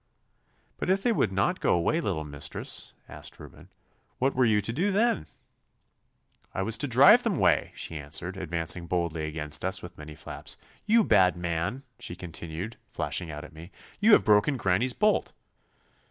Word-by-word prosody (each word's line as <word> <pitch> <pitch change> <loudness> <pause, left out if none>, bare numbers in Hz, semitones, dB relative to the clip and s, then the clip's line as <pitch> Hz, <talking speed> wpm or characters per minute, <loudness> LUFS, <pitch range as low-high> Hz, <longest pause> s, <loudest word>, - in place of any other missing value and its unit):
'But - - -3
if 195 +1 +2
they 245 - +3
would 205 - +1
not 95 0 0
go - - +2
away, 90 - +1
little 90 - -2
mistress,' 75 -1 -4
asked - - -9
Reuben, - - -13 0.5
'what 135 +2 +1
were 130 0 +3
you 110 -2 +3
to 105 +3 -2
do 180 +10 +1
then?' 205 - +1 1.3
'I - - -1
was 115 +3 +1
to 145 - 0
drive 140 - +7
them 225 -8 -1
'way,' - - +2
she 80 - -5
answered, 80 +6 -3
advancing 85 -1 0
boldly 85 -3 -1
against 75 -1 -2
us 95 +1 -2
with 90 -1 -10
many 75 0 -9
flaps. - - -6 0.3
'You 225 +1 +5
bad 90 - +4
man!' 85 +9 -2 0.2
she 85 - -6
continued, 85 +3 -6
flashing 85 - -2
out 75 0 -7
at - - -14
me, 80 +3 -11 0.3
'you 210 +2 +5
have - - +6
broken 105 +7 +4
granny's 110 +4 +1
bolt. 210 +8 +1
95 Hz, 170 wpm, -27 LUFS, 80-130 Hz, 1.3 s, drive